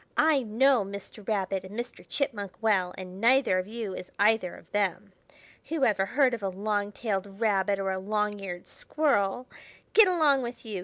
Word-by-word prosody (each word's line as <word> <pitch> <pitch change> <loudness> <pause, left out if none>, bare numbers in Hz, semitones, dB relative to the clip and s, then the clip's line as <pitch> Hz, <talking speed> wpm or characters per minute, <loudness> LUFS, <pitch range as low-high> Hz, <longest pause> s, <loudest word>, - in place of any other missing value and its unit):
"I 305 -3 +4
know 245 +1 +3
Mr. 200 +1 -9
Rabbit 195 -3 -1
and 200 +4 -7
Mr. 240 +1 -6
Chipmunk 210 -9 -2
well, 195 -5 +2
and 185 +1 -8
neither 245 -5 +4
of 185 - -4
you 220 -3 -5
is 180 - -8
either 210 -3 +2
of - - -17
them. 200 -1 -1 0.6
Who 320 -4 +1
ever 195 -3 +2
heard 260 0 +3
of 230 - -3
a 195 - -1
long 205 +2 -2
tailed 200 -2 -4
rabbit 200 -3 +2
or 195 -1 -1
a 190 - -2
long 210 +1 -1
eared 180 -3 -6
squirrel? 250 -6 0 0.5
Get 440 -2 +8
along 310 -7 +3
with 240 0 -7
you! 210 -4 -4
210 Hz, 185 wpm, -28 LUFS, 195-240 Hz, 0.6 s, Get